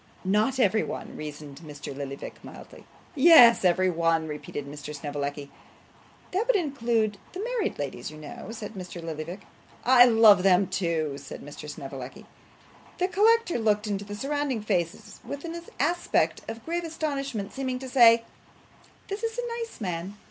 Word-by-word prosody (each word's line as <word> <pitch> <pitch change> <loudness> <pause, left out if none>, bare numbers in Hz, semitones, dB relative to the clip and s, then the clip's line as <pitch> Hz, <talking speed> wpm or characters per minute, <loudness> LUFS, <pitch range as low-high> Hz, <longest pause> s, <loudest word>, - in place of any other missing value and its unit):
'Not 215 +7 +2
every 215 -2 +3
one,' - - -6
reasoned 150 -2 -8
Mr. 150 -3 -8
Lillyvick, 140 0 -7
mildly. - - -12 0.3
'Yes, 275 - +8
every 185 +1 +3
one,' 165 -1 +1
repeated 150 -1 -6
Mr. 145 +1 -8
Snevellicci. 145 0 -5 0.8
'That 400 +6 0
would - - +3
include 235 - 0
the 375 +3 -4
married 475 -3 -2
ladies, 135 -4 -5
you 155 - -11
know,' 155 +3 -9
said 220 -2 -7
Mr. 180 -3 -8
Lillyvick. 165 +3 -6 0.4
'I 245 0 +8
love 225 -5 +7
them 190 0 +4
too, 160 -7 -2
sir,' 140 - -9
said - - -15
Mr. 145 +1 -9
Snevellicci. 135 -3 -8 0.7
The 365 +1 0
collector 420 - +3
looked 210 -1 +1
into 205 -1 -2
the 205 0 -7
surrounding 275 -1 -2
faces 180 -5 -2
with 285 +3 -7
an 335 +1 -5 0.2
aspect 335 +6 +1
of 225 +2 -7
grave 345 +1 -2
astonishment, 275 -10 -3
seeming 260 -2 -2
to 260 +1 -7
say, 235 -3 +6 0.8
'This 400 +1 -5
is 455 0 -3
a - - -2
nice 460 -1 -6
man! 185 0 -4
210 Hz, 155 wpm, -27 LUFS, -, 0.8 s, Yes